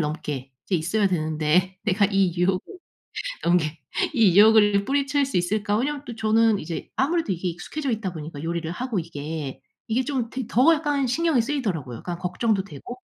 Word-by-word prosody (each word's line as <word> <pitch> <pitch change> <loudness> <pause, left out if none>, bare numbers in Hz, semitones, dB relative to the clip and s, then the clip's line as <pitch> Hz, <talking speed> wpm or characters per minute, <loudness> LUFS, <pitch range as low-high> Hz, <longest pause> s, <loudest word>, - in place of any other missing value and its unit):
넘게 150 -3 -4
이제 195 - -1
있어야 190 +6 +1
되는데 165 +2 +1
'내가 205 0 +2
이 195 -3 +2
유혹을 180 +1 +2 0.8
넘길 170 -3 +2 0.4
이 205 - +4
유혹을 205 -2 +6
뿌리칠 280 +2 +1
수 270 - -6
있을까?' 205 +3 0
왜냐하면 285 +4 -2
또 235 - -7
저는 220 -1 +3
이제 160 +1 -6
아무래도 305 - +1
이게 180 +1 -3
익숙해져 265 - -4
있다 215 -5 -2
보니까 150 -2 -7
요리를 165 0 -2
하고 240 +4 -3
이게. 155 -3 -6 0.3
이게 245 +3 +1
좀 260 -5 -2
되게 260 -3 -4
더 255 +8 +5
약간 290 -3 0
신경이 310 0 +2
쓰이더라고요 190 - -2
약간 175 -1 -5
걱정도 190 +3 0
되고. 200 - -9
200 Hz, 385 characters per minute, -24 LUFS, 170-245 Hz, 0.8 s, 유혹을